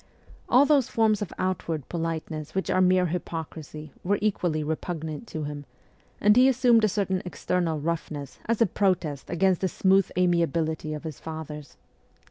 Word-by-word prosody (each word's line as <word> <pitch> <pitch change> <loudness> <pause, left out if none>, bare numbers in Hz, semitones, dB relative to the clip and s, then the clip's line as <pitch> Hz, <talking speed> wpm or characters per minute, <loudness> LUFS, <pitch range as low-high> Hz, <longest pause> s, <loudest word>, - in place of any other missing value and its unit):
All 255 +3 +6
those 285 -4 +3
forms 220 -2 +2
of 205 - -3
outward 165 -6 -2
politeness 160 -2 -4
which 190 - -1
are 185 - +3
mere 185 0 +4
hypocrisy 160 -3 -5
were 200 +3 +1
equally 175 -7 0
repugnant 160 +3 -4
to 155 -5 -5
him, 145 0 -6 0.5
and 210 +1 +5
he 255 +2 +7
assumed 245 -3 +4
a - - +5
certain 190 -2 -1
external 175 -2 -1
roughness 150 -3 -4
as 230 0 +3
a - - +4
protest 180 -7 -1
against 185 +1 +2
the 190 - +2
smooth 190 +1 +3
amiability 165 -3 +1
of 150 - -8
his 155 -4 -7
fathers. 155 -2 -8
175 Hz, 155 wpm, -26 LUFS, 155-195 Hz, 0.5 s, he